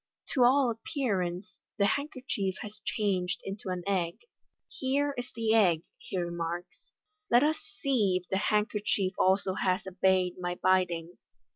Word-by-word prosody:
To 260 - +2
all 255 0 +5
appearance, 190 - -3 0.2
the 200 - +3
handkerchief 255 -6 -1
has 210 0 -9
changed 190 -3 0
into 195 0 -6
an 180 -1 -3
egg. 180 -4 0 0.3
" - - -57
Here 280 +2 +1
is 245 0 -5
the 225 -1 +1
egg,'' 175 -7 +4 0.2
he - - -5
remarks; 175 0 -4 0.2
" 420 -1 -52
let 240 +3 +6
us 310 +1 +2
see 245 -7 0
if - - -28
the 190 - 0
hand 210 +1 +1
kerchief 200 -2 0
also 190 0 +3
has 185 -1 0
obeyed 185 -1 +1
my 175 0 -2
bidding." 180 -2 +1
195 Hz, 155 wpm, -30 LUFS, 180-240 Hz, 0.3 s, let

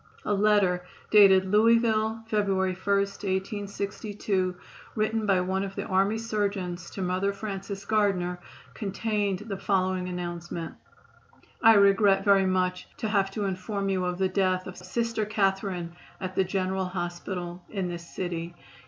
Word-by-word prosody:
A 210 - +1
letter 200 -3 +3 0.3
dated 195 -3 +7
Louisville, 220 +1 +3
February 195 -4 +1
1, 185 - -14
1862, 200 -1 -2 0.4
written 215 0 0
by 190 -2 +3
one 190 +1 -1
of 195 0 -6
the - - -3
army 195 +3 +2
surgeons 200 -6 -2
to 195 - -5
Mother 185 +2 0
Francis 195 -1 -6
Gardner, 195 -5 +1 0.3
contained 205 -1 -2
the 200 -3 -4
following 185 -2 0
announcement: 175 -1 -5 0.9
"I 225 -1 +8
regret 200 -1 +5
very 195 -2 +5
much 185 -1 0
to 220 - -2
have 200 -2 +2
to 205 +1 -3
inform 195 +1 -2
you 190 -1 0
of 180 0 -2
the 190 0 +2
death 185 -1 +1
of 185 - -8
Sister 230 +5 -2
Catherine 195 -4 -1 0.2
at 185 -1 -4
the 190 - +2
General 190 0 -1
Hospital 175 0 -4
in 195 -4 -2
this 170 -1 -7
city. 170 -1 -4
195 Hz, 140 wpm, -27 LUFS, 185-205 Hz, 0.9 s, I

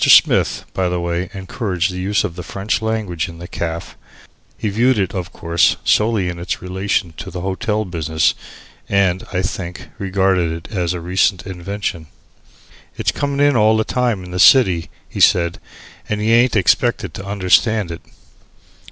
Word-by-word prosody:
Smith, - - +5
by 95 -1 0
the 90 0 -1
way, 85 +1 -2
encouraged 95 -2 -2
the 90 - -6
use 100 +3 +1
of 90 -5 -4
the 90 - -6
French 100 +5 -2
language 105 -7 -2
in 85 - -11
the 85 +1 -8
caff. 85 -1 -5 0.6
He 110 - -2
viewed 120 +5 +2
it, 95 -3 -1
of 90 -2 -4
course, 85 0 +2
solely 105 -3 +2
in 85 -1 -4
its 85 - -3
relation 95 -1 -2
to - - -7
the 90 - -6
hotel 105 +3 -1
business, 80 -3 0 0.6
and, 95 -2 +2
I 95 -1 -1
think, 90 0 -5
regarded 95 -3 +1
it 85 +6 -8
as 90 -2 0
a 85 - -5
recent 90 +3 +1
invention. 95 -3 -5 0.9
"It's - - +1
comin' 140 -1 -2
in 145 -1 +4
all 110 -1 +4
the 110 - +2
time 120 -5 -1
in 90 - -10
the 90 - -3
city," 90 -7 +5 0.2
he - - -7
said, 85 -1 +3 0.5
"and 105 - -1
y'aint 115 +3 +3
expected 95 -5 +2
to 95 - -7
understand 100 0 +2
it." 85 - -7
95 Hz, 170 wpm, -19 LUFS, 85-105 Hz, 0.9 s, Smith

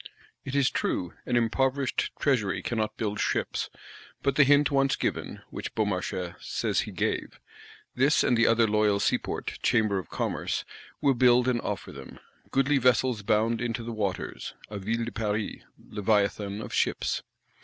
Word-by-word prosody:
It 135 - -5
is 140 -2 +3
true, 90 -1 -1
an 125 - +1
impoverished 130 +3 +1
Treasury 120 -9 +1
cannot 110 -2 -2
build 105 -2 -2
ships; - - -1 0.5
but 140 -1 +1
the 140 - +7
hint 145 +2 +4
once 135 -1 +3
given - - -3
(which - - -6
Beaumarchais 90 -4 -1
says - - -1
he - - -2
gave), - - -2 0.5
this 140 +4 +3
and 125 - +3
the 115 0 +4
other 115 0 +4
loyal 105 -1 +2
Seaport, - - -1
Chamber 110 -5 +2
of 95 - -9
Commerce, - - -2 0.4
will 140 -2 +4
build 125 0 +4
and 120 -2 +1
offer 105 -3 -4
them. 70 -1 -10 0.3
Goodly 135 +1 +2
vessels 125 -2 +3
bound 110 +2 +1
into 120 -1 -2
the 115 0 -5
waters; 100 -4 -3 0.2
a 105 - -4
Ville 115 +4 -1
de 120 - -5
Paris, 105 -1 -2 0.2
Leviathan 105 0 0
of - - -8
ships. - - 0
115 Hz, 155 wpm, -28 LUFS, 105-130 Hz, 0.5 s, the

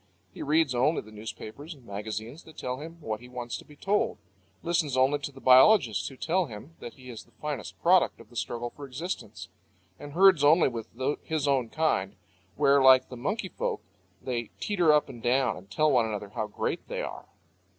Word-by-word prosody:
He - - -9
reads 155 -2 +2
only 130 +6 +2
the 110 - -15
newspapers 110 +8 -8
and 130 -4 -20
magazines 110 - -6
that 160 - -15
tell 125 +1 -4
him 165 +3 -9
what 110 -6 -3
he 125 +1 -13
wants 120 -1 -5
to - - -14
be 150 - -16
told, 200 +7 0 0.5
listens 165 -6 0
only 135 +3 +3
to 145 - -5
the 135 - -13
biologists 130 - +5
who 135 - -9
tell 175 +4 0
him 115 +8 -10
that 120 - -9
he 125 -1 -11
is 115 - -9
the 120 - -28
finest 150 -3 -5
product - - +4
of - - -16
the - - -16
struggle 120 0 -3
for 145 -1 -8
existence, 160 +8 -6 0.5
and 145 -1 -9
herds 185 -3 +6
only 155 +4 +6
with 115 -3 -6 0.3
his 155 -3 -2
own 130 -4 +1
kind, 150 -12 0 0.4
where, 140 0 +4
like 130 -1 +6
the 125 - -8
monkey 190 - -3
folk, - - -3 0.4
they 120 -2 -3
teeter 180 -6 +2
up 150 0 +3
and 125 -4 -10
down 130 +2 +2
and 95 +2 -13
tell 155 +9 +2
one 120 -3 +3
another 105 -2 -5
how 110 0 -3
great 105 - -3
they - - -3
are. - - -7
130 Hz, 200 wpm, -28 LUFS, 120-155 Hz, 0.5 s, herds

